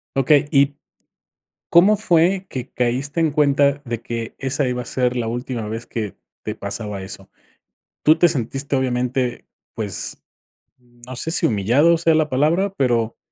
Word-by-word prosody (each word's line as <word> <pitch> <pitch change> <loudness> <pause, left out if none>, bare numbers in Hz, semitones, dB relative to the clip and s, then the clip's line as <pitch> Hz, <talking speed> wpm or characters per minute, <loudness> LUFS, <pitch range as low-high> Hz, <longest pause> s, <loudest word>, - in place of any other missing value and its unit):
Okey, 140 +2 +3
y, 140 -1 +3 1.0
¿cómo 190 +5 +6
fue 185 -1 +2
que 130 0 -6
caíste 130 +6 -1
en 160 -1 +2
cuenta 140 -1 +2
de 120 -2 -4
que 115 -1 -5
esa 135 +1 0
iba 125 0 -2
a - - -10
ser 125 0 -1
la 115 -2 -1
última 120 -1 -4
vez 115 +2 -5
que 105 -5 -5 0.3
te - - -4
pasaba 105 -3 -4
eso? 95 0 -7 0.7
Tú 155 +2 +5
te 175 - +5
sentiste 135 0 -2
obviamente, 125 -1 -1 0.3
pues, 105 -5 -2 0.6
no 120 +1 -12
sé 145 - -2
si - - +2
humillado, 125 - +3
sea 165 -1 +3
la 155 -1 +2
palabra, 165 +9 +1
pero, 120 - 0
130 Hz, 155 wpm, -21 LUFS, 120-150 Hz, 1.0 s, cómo